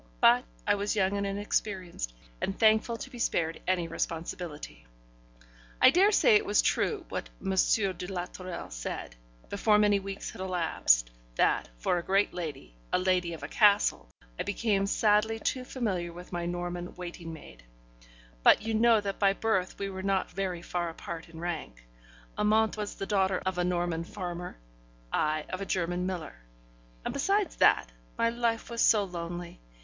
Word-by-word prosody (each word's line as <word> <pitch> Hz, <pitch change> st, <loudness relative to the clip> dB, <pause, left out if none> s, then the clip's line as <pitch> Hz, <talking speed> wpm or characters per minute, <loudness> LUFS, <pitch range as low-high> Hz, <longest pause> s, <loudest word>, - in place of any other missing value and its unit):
But -, -, +5 dB, 0.2 s
I -, -, +4 dB
was 205 Hz, +2 st, -1 dB
young 195 Hz, -1 st, +2 dB
and 200 Hz, 0 st, -1 dB
inexperienced, 195 Hz, -, -2 dB, 0.3 s
and 195 Hz, -, -2 dB
thankful 220 Hz, +1 st, +3 dB
to 270 Hz, -, -7 dB
be 245 Hz, -, -9 dB
spared 165 Hz, -7 st, 0 dB
any 180 Hz, -2 st, +1 dB
responsibility. 160 Hz, -, -5 dB, 0.9 s
I 255 Hz, -, +8 dB
daresay 405 Hz, -, +5 dB
it 420 Hz, -, -1 dB
was -, -, +3 dB
true 405 Hz, -6 st, 0 dB
what -, -, -4 dB
M. 195 Hz, -, -3 dB
de 190 Hz, -1 st, +1 dB
la 180 Hz, -2 st, -3 dB
Tourelle 185 Hz, -, -7 dB
said -, -, -5 dB, 0.3 s
before 210 Hz, +1 st, +3 dB
many 205 Hz, -1 st, +4 dB
weeks 195 Hz, 0 st, -6 dB
had -, -, -9 dB
elapsed 165 Hz, -, +2 dB, 0.2 s
that, -, -, +2 dB
for 175 Hz, -, +1 dB
a -, -, -6 dB
great 195 Hz, +3 st, +2 dB
lady, 150 Hz, -, -6 dB, 0.2 s
a -, -, +3 dB
lady 180 Hz, -1 st, +1 dB
of 165 Hz, -, -8 dB
a -, -, -3 dB
castle, 205 Hz, -, +3 dB, 0.3 s
I -, -, +1 dB
became 205 Hz, -1 st, 0 dB
sadly 210 Hz, +1 st, +3 dB
too 255 Hz, +3 st, -2 dB
familiar 195 Hz, -10 st, -2 dB
with 180 Hz, +2 st, -11 dB
my 175 Hz, 0 st, -2 dB
Norman 175 Hz, 0 st, -4 dB
waiting 175 Hz, -2 st, -7 dB
maid. 150 Hz, -, -12 dB, 0.8 s
But -, -, +6 dB
you 225 Hz, 0 st, -2 dB
know 225 Hz, 0 st, +5 dB
that 200 Hz, -1 st, -4 dB
by 195 Hz, -1 st, +4 dB
birth 195 Hz, -3 st, 0 dB
we 200 Hz, 0 st, -3 dB
were 190 Hz, 0 st, -5 dB
not 195 Hz, 0 st, 0 dB
very 185 Hz, -3 st, -3 dB
far 175 Hz, -1 st, -2 dB
apart 165 Hz, 0 st, -7 dB
in 165 Hz, -1 st, -11 dB
rank: 160 Hz, -, -5 dB, 0.5 s
Amante 220 Hz, +1 st, +3 dB
was 210 Hz, -1 st, -4 dB
the 195 Hz, -, -4 dB
daughter 190 Hz, -2 st, +2 dB
of 190 Hz, -1 st, -1 dB
a -, -, +2 dB
Norman 175 Hz, -2 st, 0 dB
farmer, 175 Hz, -, -6 dB, 0.6 s
I 155 Hz, 0 st, +1 dB
of 185 Hz, -, -4 dB
a -, -, -2 dB
German 180 Hz, 0 st, -1 dB
miller; 175 Hz, -, -5 dB, 0.7 s
and -, -, -2 dB
besides 390 Hz, +6 st, +1 dB
that, -, -, +4 dB, 0.3 s
my 230 Hz, -, +2 dB
life 235 Hz, -1 st, -1 dB
was 235 Hz, -, -1 dB
so 210 Hz, -2 st, +5 dB
lonely! 175 Hz, -1 st, -6 dB
185 Hz, 170 wpm, -29 LUFS, 175-210 Hz, 0.9 s, I